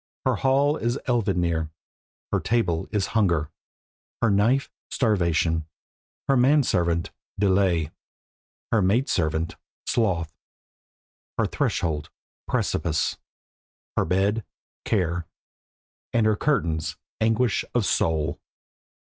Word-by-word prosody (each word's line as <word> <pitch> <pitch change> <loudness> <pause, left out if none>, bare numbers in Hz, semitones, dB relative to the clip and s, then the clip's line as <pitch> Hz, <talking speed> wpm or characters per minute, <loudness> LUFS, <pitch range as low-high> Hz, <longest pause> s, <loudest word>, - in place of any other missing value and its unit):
Her - - +2
hall 140 +3 +3
is 120 +3 -1
Elvidnir; 90 -9 +1 0.6
her - - +2
table 90 -8 0
is 105 -3 +1
Hunger; 85 -9 +2 0.7
her 115 -3 +3
knife, 115 +7 +2 0.2
Starvation; 85 - +1 0.6
her 135 - +4
man 135 +4 +5
servant, 85 -5 0 0.3
Delay; 95 -6 +2 0.8
her 110 - +3
maid 110 +8 +2
servant, 80 -1 0 0.3
Sloth; 85 -9 0 1.0
her - - +2
threshold, 75 -3 -1 0.4
Precipice; 80 -2 0 0.8
her - - +2
bed, 100 +4 +1 0.4
Care; 85 -5 0 0.9
and 115 -2 +3
her 110 -1 +4
curtains, 85 - 0 0.2
Anguish 115 +1 +2
of 120 -4 +2
Soul. 80 -5 0
95 Hz, 100 wpm, -25 LUFS, 85-115 Hz, 1.0 s, man